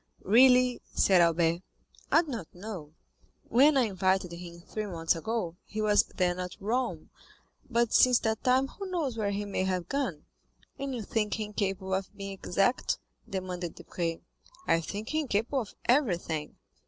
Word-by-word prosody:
"Really," 250 +3 +5
said 185 -3 +5
Albert, 170 0 +3 0.5
"I 330 - +6
do - - -14
not 225 - -4
know; 175 -6 -8 0.5
when 275 +5 +5
I 260 - +5
invited 190 -3 +1
him 170 0 -9
three 215 +4 -5
months 165 -3 0
ago, 175 -1 -3
he 215 - -7
was 210 -1 +4
then 180 -1 +1
at 180 +2 -5
Rome, 235 +6 -2 0.6
but 235 -2 +1
since 250 -1 +6
that 220 -1 -1
time 260 +1 +3
who 390 +6 -8
knows 315 -9 -1
where 215 -3 -1
he 200 +1 -2
may 200 -2 -1
have 185 -2 -1
gone?" 255 - -2 0.5
"And 275 -1 -3
you 230 - -4
think 210 +1 -1
him 210 -1 -4
capable 195 -2 -2
of 195 +2 -3
being 195 -1 -5
exact?" 195 +5 0 0.3
demanded 180 -3 -4
Debray. 165 -2 -4 0.4
"I 165 - +3
think 205 +6 -5
him 310 -2 0
capable 235 +5 0
of 215 - -9
everything." 175 - +1
200 Hz, 165 wpm, -29 LUFS, 180-240 Hz, 0.6 s, I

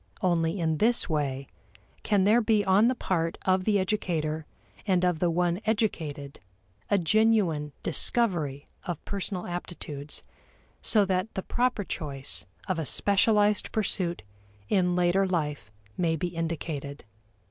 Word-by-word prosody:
Only 170 0 +1
in 160 -2 +1
this 235 +2 +3
way 140 -5 -1 0.6
can 205 -3 +2
there 215 +5 +5
be 215 -2 +2
on 195 +4 +5
the 255 - +2
part 165 -7 -1
of 185 0 +2
the 210 -2 +3
educator 165 -6 -1 0.4
and 180 -2 +3
of 175 -3 +1
the 175 - +2
one 175 +2 0
educated 155 -10 -2 0.5
a 205 - +4
genuine 185 -5 +2
discovery 165 - +1 0.2
of 175 - -5
personal 195 -2 -3
aptitudes 155 -5 -6 0.6
so 210 -3 +3
that 185 +2 -1
the 190 - -2
proper 245 -3 0
choice 135 - -4 0.2
of 185 -3 -1
a 160 - -2
specialized 205 +1 +2
pursuit 185 -5 -1 0.5
in 180 -2 +2
later 180 +2 +3
life 150 - -2 0.3
may 165 -2 +1
be 175 +3 -2
indicated. 160 -4 -4
180 Hz, 135 wpm, -28 LUFS, 160-205 Hz, 0.6 s, there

